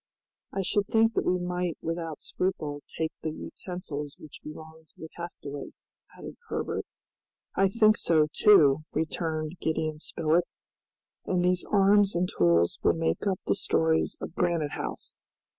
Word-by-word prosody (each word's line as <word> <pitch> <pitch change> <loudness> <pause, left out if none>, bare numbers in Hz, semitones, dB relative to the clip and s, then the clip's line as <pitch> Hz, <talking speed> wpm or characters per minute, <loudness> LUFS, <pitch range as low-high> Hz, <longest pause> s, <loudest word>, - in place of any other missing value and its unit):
"I 195 - -2
should 200 +2 0
think 225 0 +3
that - - 0
we 180 - +3
might 180 -1 -2
without 165 -1 -4
scruple 155 -6 -2 0.2
take 160 0 -1
the 160 - -2
utensils 155 -3 -6
which 155 - -12
belonged 160 +1 -11
to - - -25
the 160 - -8
castaway," 145 -5 -7 0.4
added - - -9
Herbert. - - -3 0.7
"I 195 0 +3
think 215 +1 +4
so, 155 -2 +3
too," 155 -8 +6
returned 160 +1 -2
Gideon 155 -1 -1
Spilett, 165 +2 +1 0.8
"and 180 -1 +1
these 180 0 +2
arms 200 0 +4
and 175 +1 +1
tools 85 - +2
will - - +4
make 165 +5 -1
up 190 -2 0
the - - +2
stores 160 0 +1
of - - -6
Granite 170 -5 0
House. - - -5
165 Hz, 145 wpm, -28 LUFS, 155-185 Hz, 0.8 s, too